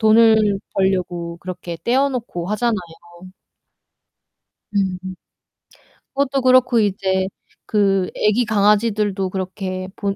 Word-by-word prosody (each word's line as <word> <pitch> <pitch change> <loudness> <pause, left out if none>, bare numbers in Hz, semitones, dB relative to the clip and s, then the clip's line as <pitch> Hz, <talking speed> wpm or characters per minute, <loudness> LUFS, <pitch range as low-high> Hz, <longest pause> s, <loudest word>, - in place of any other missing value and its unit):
돈을 220 -2 +5 0.2
벌려고 180 -3 -1
그렇게 180 -2 -7
떼어 265 +4 +3
놓고 225 -9 -5
하잖아요. 230 +2 +1 2.0
음음. 190 -2 0 1.2
그것도 275 0 0
그렇고 255 -2 +4
이제 190 -2 0 0.4
그 195 -3 +1
애기 215 +3 +2
강아지들도 210 -2 +1
그렇게 185 0 -4
본 200 -1 -2
205 Hz, 225 characters per minute, -20 LUFS, 190-230 Hz, 2.0 s, 돈을